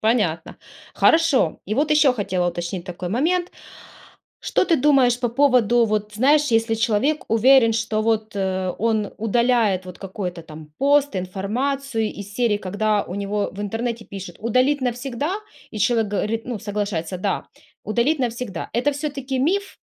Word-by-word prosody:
понятно. 210 Hz, -8 st, 0 dB, 0.3 s
Хорошо, 320 Hz, -, +3 dB
и 215 Hz, -, -2 dB
вот 300 Hz, +3 st, +2 dB
еще 295 Hz, -4 st, +5 dB
хотела 190 Hz, -5 st, -1 dB
уточнить 175 Hz, +1 st, -4 dB
такой 180 Hz, -1 st, -6 dB
момент. 345 Hz, -, 0 dB, 0.9 s
Что -, -, +1 dB
ты 335 Hz, -, +3 dB
думаешь 255 Hz, -4 st, +4 dB
по 240 Hz, -, +1 dB
поводу 240 Hz, -3 st, +3 dB
вот, 210 Hz, 0 st, -2 dB
знаешь, 285 Hz, +7 st, +4 dB
если 225 Hz, 0 st, +2 dB
человек 230 Hz, +7 st, +1 dB
уверен, 230 Hz, +1 st, +5 dB
что 220 Hz, -1 st, -1 dB
вот, 220 Hz, -1 st, 0 dB
э, 190 Hz, -1 st, -1 dB
он 220 Hz, -2 st, 0 dB
удаляет 225 Hz, -4 st, +1 dB
вот 180 Hz, -, -10 dB
какой-то 185 Hz, -3 st, -6 dB
там 155 Hz, -1 st, -12 dB
пост, 285 Hz, -5 st, +3 dB
информацию, 225 Hz, +6 st, -2 dB
из 205 Hz, 0 st, -9 dB
серии, 230 Hz, -4 st, +1 dB
когда 205 Hz, +2 st, 0 dB
у 180 Hz, -, -7 dB
него 205 Hz, +1 st, -2 dB
в 200 Hz, -, -8 dB
интернете 225 Hz, +2 st, -3 dB
пишут 190 Hz, -3 st, -9 dB
"Удалить 255 Hz, +6 st, +2 dB
навсегда", 255 Hz, -, -2 dB, 0.3 s
и 215 Hz, -, -6 dB
человек 225 Hz, 0 st, +2 dB
говорит, 215 Hz, +3 st, -2 dB
ну 240 Hz, -4 st, -4 dB
соглашается, 200 Hz, -5 st, -3 dB
"Да, 195 Hz, 0 st, -2 dB, 0.4 s
удалить 240 Hz, +8 st, +1 dB
навсегда". 235 Hz, -7 st, -3 dB
Это 285 Hz, +5 st, +1 dB
всё-таки 275 Hz, -2 st, -4 dB
миф, 380 Hz, +8 st, -1 dB
225 Hz, 150 wpm, -22 LUFS, 200-260 Hz, 0.9 s, еще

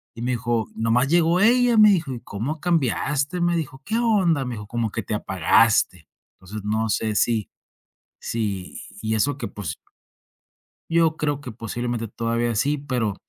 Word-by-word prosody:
y 115 Hz, -, -8 dB
me 125 Hz, -, 0 dB
dijo: 115 Hz, -1 st, -1 dB
"Nomás 115 Hz, +4 st, +2 dB
llegó 170 Hz, +1 st, +3 dB
ella", 240 Hz, +2 st, +4 dB
me 215 Hz, -1 st, +8 dB
dijo, 165 Hz, -8 st, 0 dB
"Y 120 Hz, -, -6 dB
como 125 Hz, +9 st, -4 dB
cambiaste", 150 Hz, 0 st, 0 dB
me 175 Hz, 0 st, +2 dB
dijo, 135 Hz, -4 st, -5 dB
"¿Qué 220 Hz, -, -1 dB
onda?" 190 Hz, -, +2 dB
Me 125 Hz, -1 st, -4 dB
dijo, 105 Hz, -1 st, -8 dB
"Como 115 Hz, -1 st, -2 dB
que 115 Hz, -, -3 dB
te 105 Hz, -, -4 dB
apagaste". 95 Hz, -3 st, +2 dB, 0.3 s
Entonces 100 Hz, +3 st, -8 dB
no 110 Hz, +1 st, 0 dB
sé 110 Hz, +1 st, 0 dB
si 110 Hz, -1 st, +1 dB, 0.7 s
si 100 Hz, -5 st, -4 dB, 0.2 s
y 110 Hz, 0 st, -1 dB
eso 135 Hz, +5 st, 0 dB
que, -, -, -4 dB
pues 105 Hz, -, -6 dB, 1.1 s
yo 165 Hz, -1 st, +3 dB
creo 145 Hz, -2 st, -1 dB
que 125 Hz, -5 st, -8 dB
posiblemente 115 Hz, +1 st, -4 dB
todavía 115 Hz, +2 st, -1 dB
sí, 145 Hz, +6 st, +1 dB
pero 125 Hz, -7 st, -2 dB
120 Hz, 165 wpm, -23 LUFS, 110-155 Hz, 1.1 s, me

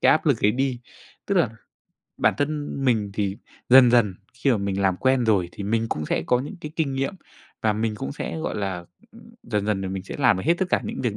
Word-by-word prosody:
cái -, -, +5 dB
áp -, -, +1 dB
lực -, -, +2 dB
ấy 105 Hz, -, +5 dB
đi. 130 Hz, -1 st, -1 dB, 0.5 s
Tức 200 Hz, -, 0 dB
là 165 Hz, -, +3 dB, 0.7 s
bản -, -, +3 dB
thân 145 Hz, 0 st, -1 dB
mình 110 Hz, -5 st, +2 dB
thì 100 Hz, -1 st, -1 dB, 0.3 s
dần 125 Hz, -1 st, +8 dB
dần 115 Hz, -6 st, +3 dB, 0.2 s
khi 130 Hz, +2 st, +1 dB
mà 120 Hz, -, +3 dB
mình 100 Hz, -1 st, -2 dB
làm 95 Hz, -2 st, +2 dB
quen 130 Hz, +1 st, +2 dB
rồi 100 Hz, -6 st, +2 dB
thì 100 Hz, -, -7 dB
mình 115 Hz, +3 st, 0 dB
cũng 75 Hz, -6 st, -3 dB
sẽ -, -, 0 dB
có 125 Hz, -, +3 dB
những 150 Hz, +8 st, -7 dB
cái 150 Hz, -, -6 dB
kinh 150 Hz, -5 st, 0 dB
nghiệm, 135 Hz, +5 st, -1 dB, 0.5 s
và 110 Hz, -1 st, +3 dB
mình 110 Hz, +1 st, -1 dB
cũng 70 Hz, -10 st, -5 dB
sẽ, 80 Hz, -, -5 dB
gọi -, -, -3 dB
là, 95 Hz, -4 st, -3 dB, 0.3 s
ừm, 230 Hz, -, -15 dB, 0.2 s
dần 105 Hz, -3 st, -2 dB
dần 105 Hz, -2 st, 0 dB
là 95 Hz, -, -3 dB
mình 95 Hz, 0 st, -4 dB
sẽ -, -, -7 dB
làm 125 Hz, -8 st, +4 dB
được 95 Hz, -, -4 dB
hết 170 Hz, -, +5 dB
tất 190 Hz, -, +1 dB
cả -, -, +3 dB
những -, -, -4 dB
việc 110 Hz, -4 st, -1 dB
110 Hz, 255 wpm, -24 LUFS, 100-135 Hz, 0.7 s, dần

